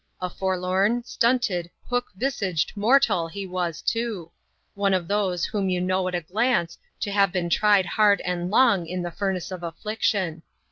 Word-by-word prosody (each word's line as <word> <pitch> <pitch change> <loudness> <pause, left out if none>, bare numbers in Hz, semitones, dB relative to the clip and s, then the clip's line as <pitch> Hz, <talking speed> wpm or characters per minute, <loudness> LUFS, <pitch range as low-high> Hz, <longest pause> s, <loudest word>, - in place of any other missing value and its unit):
A 180 -1 -3
forlorn, 190 +5 0
stunted, 230 -9 0 0.2
hook 245 0 -1
visaged 195 - -1
mortal 215 -5 +3
he 200 +4 -6
was 180 -4 -3
too; 225 -8 -2 0.4
one 200 -1 +1
of 175 -2 -2
those, 190 -4 0
whom 200 -3 -1
you 180 -1 0
know 185 +1 0
at 180 - -2
a 175 - -1
glance 185 0 0 0.3
to 205 - -2
have 200 -2 +3
been 175 -2 -2
tried 205 0 +4
hard 205 -1 +3
and 180 0 -2
long 205 -6 +4
in 180 +1 -3
the 175 - -4
furnace 190 0 -3
of 185 -2 -6
affliction. 185 -1 -2
190 Hz, 170 wpm, -24 LUFS, 180-210 Hz, 0.4 s, tried